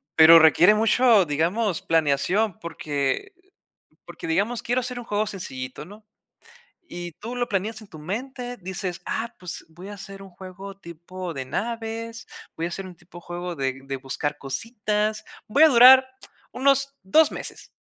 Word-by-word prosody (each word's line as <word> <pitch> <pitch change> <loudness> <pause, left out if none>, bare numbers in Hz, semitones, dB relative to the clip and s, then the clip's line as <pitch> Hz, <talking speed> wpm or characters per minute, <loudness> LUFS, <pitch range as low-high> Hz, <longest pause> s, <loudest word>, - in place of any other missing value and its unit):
Pero 165 +1 +9
requiere 175 +6 +6
mucho, 225 -1 +4
digamos, 170 +6 0
planeación 165 +6 +1
porque 155 - -3
el - - -38 0.7
porque - - -10
digamos, 245 -7 0
quiero 245 +2 0
hacer 250 0 -5
un 240 - -9
juego 210 -1 -1
sencillito, 130 -10 -6
¿no? 210 +3 -14 0.8
Y 175 -1 -7
tú 230 +9 -8
lo 245 0 0
planeas 210 +3 -2
en 205 - -15
tu 155 - -12
mente, 245 - -5
dices: 190 -1 -5
“Ah, 235 +1 -3
pues 180 -2 -8
voy 175 +5 -12
a 205 - -7
hacer 195 0 -10
un 195 - -12
juego 190 +2 -10
tipo 170 0 -8
de 135 - -4
naves, 230 - -5 0.3
voy 165 - -3
a - - -2
hacer 195 +2 -6
un 180 -2 -11
tipo 175 0 -14
juego 175 0 -6
de 135 -2 -3
de 135 0 -4
buscar 145 +3 -4
cositas, 210 - -2 0.2
voy 260 +8 +3
a 320 - +8
durar 260 +1 +8 0.5
unos 275 +1 +2
2 310 +12 +4
meses”. - - -6
195 Hz, 165 wpm, -24 LUFS, 170-230 Hz, 0.8 s, Pero